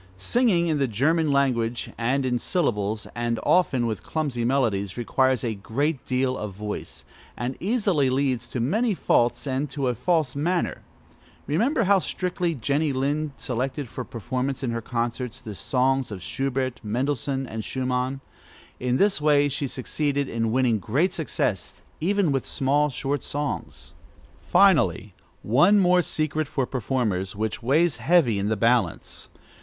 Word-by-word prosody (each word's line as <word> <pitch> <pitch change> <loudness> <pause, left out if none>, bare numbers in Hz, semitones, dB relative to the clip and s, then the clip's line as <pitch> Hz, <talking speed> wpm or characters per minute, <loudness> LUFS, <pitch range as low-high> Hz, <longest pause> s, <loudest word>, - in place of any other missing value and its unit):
Singing 180 - +2
in 155 -3 0
the 135 - +2
German 150 +8 +1
language, 120 -4 0
and 130 +4 0
in 125 -1 0
syllables, 110 - -1
and 120 -1 -1
often 140 -9 +3
with 110 -4 -2
clumsy 140 -7 -2
melodies, 115 -7 0
requires 130 +1 +1
a 115 -2 -1
great 135 +8 -2
deal 130 0 +1
of 105 -5 -5
voice, 105 +1 -6 0.3
and 125 +2 -3
easily 195 - +1
leads 130 -3 0
to 125 - -4
many 210 - +1
faults 120 -5 +1
and 135 +1 -1
to 140 -2 -1
a - - +1
false 155 +1 0
manner. 170 +5 -1 0.6
Remember 230 - +1
how 200 0 +4
strictly 180 -2 -2
Jenny 140 +5 0
Lind 140 +3 -1
selected, 130 +3 -3
for 125 - -5
performance 125 +3 -3
in 125 - -1
her 115 0 -2
concerts, 120 +1 -3
the 110 - -8
songs 130 +4 0
of 95 -3 -6
Schubert, 135 -2 -2
Mendelssohn, 135 +4 -1
and 110 -2 -5
Schumann. 130 +3 -2 0.6
In 125 0 0
this 200 -3 +2
way 145 -1 +4
she 140 0 -2
succeeded 140 +2 -1
in 115 -2 -1
winning 120 -3 +2
great 140 - +1
success, 110 - -2 0.2
even 190 0 +1
with 135 -2 0
small, 145 +2 +1
short 140 0 -2
songs. 145 +2 -5 0.5
Finally, 155 - +3 0.3
one 175 - +5
more 180 -2 +5
secret 155 -2 -1
for 135 -2 -1
performers, 110 -7 -1
which 110 +1 -3
weighs 150 +6 +2
heavy 150 - +3
in 100 +1 -1
the 110 - 0
balance. 115 -5 0
130 Hz, 150 wpm, -25 LUFS, 120-150 Hz, 0.6 s, one